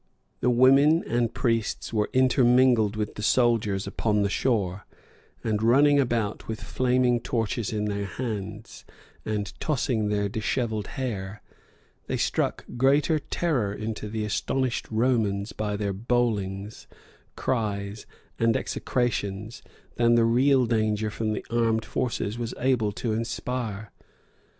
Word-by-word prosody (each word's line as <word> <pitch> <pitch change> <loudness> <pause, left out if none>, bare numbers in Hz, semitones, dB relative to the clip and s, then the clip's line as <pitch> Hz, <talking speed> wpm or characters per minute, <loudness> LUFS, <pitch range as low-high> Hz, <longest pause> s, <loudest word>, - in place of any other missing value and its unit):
The - - +2
women 135 +6 +5
and 120 0 0
priests 115 -2 -1
were 105 -1 +1
intermingled 125 -4 +4
with 105 -1 -3
the - - -7
soldiers 110 -4 +2
upon 105 +1 0
the 100 - 0
shore; 100 -7 -1 0.6
and 110 -2 0
running 140 +5 +5
about 120 -5 -1
with 110 0 -4
flaming 125 -1 +1
torches 115 -1 -2
in 105 -1 -1
their 100 -1 -2
hands, 110 -2 -6 0.4
and 105 -1 -3
tossing 120 -7 0
their 105 -1 0
dishevelled 110 0 -2
hair, 105 -6 -4 0.6
they - - -1
struck - - -1
greater 145 +5 +3
terror 140 -10 -1
into 105 0 -5
the 110 0 -2
astonished 130 +4 -1
Romans 110 -3 +1
by 105 -1 -2
their 100 -1 -2
bowlings, 105 -2 -2 0.5
cries, 105 -4 -2 0.3
and 115 -1 +3
execrations, 110 -4 -2 0.4
than 120 0 +4
the 115 -1 +4
real 130 +3 +4
danger 110 -2 0
from 110 0 -2
the - - -5
armed 115 -1 +1
forces 115 -2 -2
was 120 0 -4
able 120 -5 +1
to 110 +1 -2
inspire. 115 -2 -3
115 Hz, 125 wpm, -26 LUFS, 105-125 Hz, 0.6 s, women